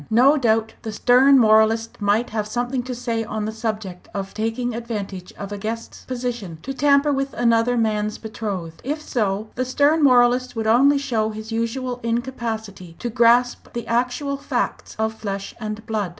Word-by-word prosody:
No 255 +6 +5
doubt 225 -5 +1
the 220 - -5
stern 255 +6 +5
moralist 220 -1 +3
might 205 +4 +1
have 215 -1 -2
something 245 +3 -1
to 250 0 -5
say 230 -2 -2
on 215 -1 -3
the 215 - -2
subject 215 -5 -5
of 195 -1 -4
taking 225 +3 -2
advantage 205 -6 -5
of 200 0 -8
a 205 - -5
guest's 225 +3 -6
position 240 -9 -4
to 270 - -4
tamper 280 +2 +3
with 275 0 -2
another 235 0 +2
man's 215 -2 0
betrothed. 200 -7 -5
If 295 +4 -2
so, 215 -7 -2
the 255 - -1
stern 285 +5 +2
moralist 250 -1 +4
would 225 -1 -2
only 265 +6 +5
show 225 -6 0
his 215 +1 -7
usual 240 +2 -2
incapacity 225 -6 -4
to 240 - -4
grasp 240 +1 +3
the 235 -1 -4
actual 250 +4 -1
facts 280 - -3
of 220 0 0
flesh 200 -3 -5
and 215 0 -5
blood. 215 -5 -2
230 Hz, 170 wpm, -22 LUFS, 215-250 Hz, -, No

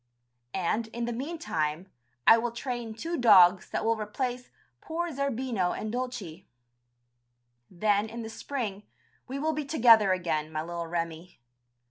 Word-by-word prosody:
And, 210 +5 0
in 235 +1 -4
the 240 - -3
meantime, 190 - -3 0.3
I 230 - +8
will 240 +1 -2
train 235 -2 -5
two 335 +9 -3
dogs 190 -6 +6
that - - -2
will 230 0 +3
replace 245 +4 -4 0.3
poor 340 +1 -3
Zerbino 255 - -1
and 215 - -4
Dulcie. 245 -9 -5 1.2
Then 205 +3 +1
in 230 +1 -6
the 220 - -6
spring 225 -6 -4 0.5
we 265 - -4
will 315 +3 0
be 305 0 -2
together 230 -8 +5
again, 160 -4 -1
my 155 0 -3
little 170 0 -5
Remi. 165 -1 -4
225 Hz, 140 wpm, -28 LUFS, 180-250 Hz, 1.2 s, I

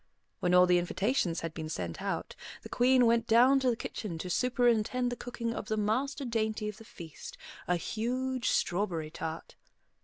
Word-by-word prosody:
When 180 0 +2
all 180 0 +8
the 180 -1 +4
invitations 175 -1 0
had 165 -1 -4
been 160 -1 -6
sent 85 - -4
out, - - -3 0.3
the - - -9
Queen 250 0 +4
went 230 0 +3
down 250 +4 +6
to 260 -1 +2
the 240 - +1
kitchen 205 -5 -5
to 180 +2 -5
superintend 245 +1 +1
the - - -2
cooking 235 -1 -4
of 210 - -6
the 215 - -1
master 260 +7 -1
dainty 220 -2 -1
of 210 -1 -5
the 225 - -12
feast, 165 -8 -10 0.3
a 180 - +2
huge 250 +7 -2
strawberry 175 -5 0
tart. 160 0 -6
220 Hz, 180 wpm, -30 LUFS, 175-245 Hz, 0.3 s, all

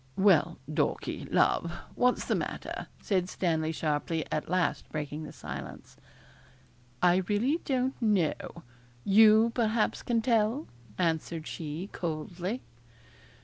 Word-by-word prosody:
'Well, 175 -4 +4
Dorkie, 155 -1 -2
love, 170 - +3 0.2
what's 250 0 +2
the - - +1
matter?' - - -4 0.2
said 185 -4 +1
Stanley 160 -4 0
sharply, 155 +1 -1
at 155 - -2
last 180 0 0
breaking 150 0 -4
the - - -8
silence. - - -8 1.1
'I 180 0 +6
really 245 +10 +1
don't 260 -1 -1
know 180 -5 0 0.4
you, 220 +3 +6
perhaps, 225 -2 +1
can 230 -2 0
tell,' 230 +3 +2 0.3
answered 165 -1 -1
she 160 +4 -5
coldly. 175 +7 -4
180 Hz, 110 wpm, -29 LUFS, 160-220 Hz, 1.1 s, I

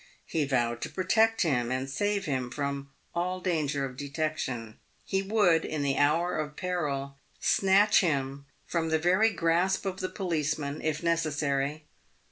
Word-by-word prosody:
He 155 -3 0
vowed 120 -3 0
to - - -3
protect 220 +5 +2
him, 125 -7 +1
and 130 +1 -1
save 205 +7 -1
him 130 -5 -1
from 140 0 -3 0.2
all 180 +2 -1
danger 150 -6 0
of 125 -1 -8
detection. 140 -6 -3 0.3
He 195 -1 0
would 195 -5 +3
in 155 -2 -2
the 140 -1 +1
hour 155 +4 +2
of 150 -1 -4
peril 145 -7 -2 0.2
snatch 200 +2 +4
him 140 -4 -1 0.2
from 165 -2 -1
the 160 - +3
very 185 +7 +4
grasp 175 +3 +1
of 190 -1 -3
the 185 - -2
policeman, 155 -5 -2
if 155 0 -2
necessary. 150 -3 0
155 Hz, 150 wpm, -29 LUFS, 140-180 Hz, 0.3 s, snatch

